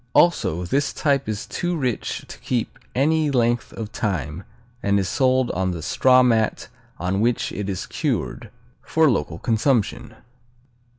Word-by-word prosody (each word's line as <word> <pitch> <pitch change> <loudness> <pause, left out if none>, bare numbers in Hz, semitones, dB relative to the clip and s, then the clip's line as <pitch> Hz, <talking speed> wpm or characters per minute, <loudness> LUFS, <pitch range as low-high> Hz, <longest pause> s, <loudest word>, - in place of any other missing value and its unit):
Also, 90 - +3
this 140 +10 0
type 140 -4 +1
is 105 -1 -3
too 175 -1 -2
rich 125 -7 -2
to - - -10
keep 120 -3 -2 0.2
any 155 +3 +2
length 120 -3 +1
of 110 -2 -6
time 90 - -3 0.4
and 100 0 +2
is 95 - -1
sold 130 +4 +2
on 95 +1 -1
the 85 -3 -4
straw 130 +9 +4
mat 115 -3 +1 0.3
on 90 +4 -1
which 120 +1 +1
it 100 -1 -4
is 95 -2 -3
cured, - - -2 0.3
for 160 -3 +3
local 80 -5 -2
consumption. 115 0 0
115 Hz, 150 wpm, -23 LUFS, 95-130 Hz, 0.4 s, straw